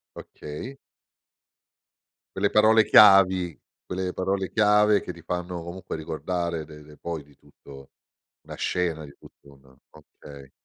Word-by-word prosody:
Okay. 120 - -9 1.6
Quelle 100 +1 0
parole 110 +1 +5
chiavi, 95 -4 +5 0.3
quelle 90 0 -4
parole 95 0 -2
chiave 105 -1 +3
che - - -7
ti 85 -2 -15
fanno 90 -1 -5
comunque 90 +1 -7
ricordare 85 +1 -4
de 75 0 -13
de 75 0 -16
poi 85 -3 -6
di 70 -1 -23
tutto 70 -1 -16 0.5
una - - -11
scena, 85 -4 -2
di 70 -1 -13
tutto 70 - -19
un 65 -1 -22
okay. 70 -2 -15
85 Hz, 130 wpm, -25 LUFS, 75-95 Hz, 1.6 s, parole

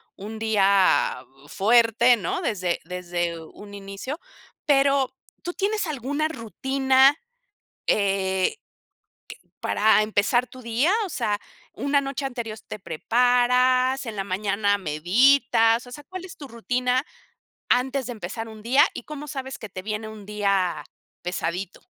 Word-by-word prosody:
un 215 +3 -8
día 200 -3 +3 0.2
u - - -17
fuerte, 235 +5 +4
¿no?, 375 - -3
desde 185 - -1
desde 175 -1 -3
un 205 +5 -13
inicio. 200 - -6 0.5
Pero, 275 -2 +3 0.3
¿tú 350 - -4
tienes 410 -2 -1
alguna 290 +2 -1
rutina, 265 +1 +2 0.7
eh, 195 - +1 0.9
q - - -35
para 215 0 +3
empezar 220 +4 +1
tu 255 +2 -13
día? 235 +9 +1
O - - -7
sea, 210 -8 -1 0.3
¿una 280 0 +1
noche 275 0 -4
anterior 235 -4 -5
te - - -6
preparas, 250 - +2
en 220 -2 -6
la 195 - -1
mañana 200 +1 0
meditas? 225 - +3
O - - -12
sea, 295 +3 -9
¿cuál 370 +4 -8
es 360 - -11
tu 280 - -9
rutina 250 +2 0 0.7
antes 260 +1 +1
de 245 - -4
empezar 225 +2 -6
un 215 -1 -11
día 265 +5 +5
y - - -7
cómo 300 -1 -8
sabes 270 -1 -6
que 220 - -8
te 185 0 -8
viene 215 +1 -4
un 215 -2 -11
día 195 -6 0 0.4
pesadito? 180 +1 -3
230 Hz, 140 wpm, -24 LUFS, 200-265 Hz, 0.9 s, día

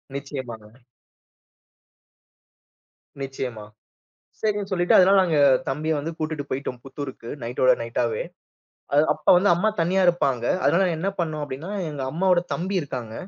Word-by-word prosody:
நிச்சயமாங்க. 125 -6 -7 2.5
நிச்சயமா. 130 -5 -5 0.8
சரின்னு 205 -2 -1
சொல்லிட்டு 175 -1 +3
அதனால 195 +1 +6
நாங்க 165 -4 +1 0.3
தம்பிய 150 +4 -2
வந்து 155 +3 -4
கூட்டிட்டு 155 -2 -3
போயிட்டோம், 130 -2 -4
புத்தூருக்கு, 135 -3 -8
நைட்டோட 125 +2 +2
நைட்டாவே. 115 -1 -1 0.7
அது 145 +2 +5
அப்ப 150 - -17
வந்து 195 +3 +3
அம்மா 200 +6 +2
தனியா 185 +3 +2
இருப்பாங்க. 135 -9 +1 0.2
அதனால 185 +3 +3
என்ன 175 +5 -2
பண்ணோம் 155 -3 -2
அப்பிடீன்னா, 145 +6 -6 0.2
எங்க 145 -2 -6
அம்மாவோட 180 +2 +2
தம்பி 190 +3 -3
இருக்காங்க. 125 -6 -6
150 Hz, 120 wpm, -24 LUFS, 130-175 Hz, 2.5 s, அதனால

